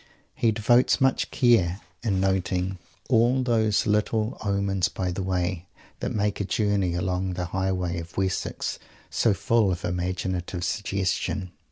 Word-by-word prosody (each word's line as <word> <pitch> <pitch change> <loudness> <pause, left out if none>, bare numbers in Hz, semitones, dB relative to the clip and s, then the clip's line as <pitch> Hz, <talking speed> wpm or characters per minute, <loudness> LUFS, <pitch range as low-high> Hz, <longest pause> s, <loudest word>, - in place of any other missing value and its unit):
He 115 - +2
devotes 120 +3 +3
much 130 0 +2
care 105 -8 +3 0.2
to 115 - -2
noting 95 -1 0 0.3
all 125 +2 +3
those 110 -4 +2
little 110 +2 +1
"omens 100 -3 +1
by 90 -1 -2
the 90 - -3
way" 90 -1 -1 0.3
that - - -2
make 105 -1 0
a - - +1
journey 100 -3 0
along 90 +1 -1
the 90 0 -3
great - - -9
highways 90 -2 -1
of 85 +1 -12
Wessex 95 -1 -2 0.3
so 110 -4 +2
full 110 -1 +2
of 85 - -3
imaginative 90 0 -2
suggestion. 95 -2 -1
95 Hz, 145 wpm, -26 LUFS, 90-105 Hz, 0.3 s, devotes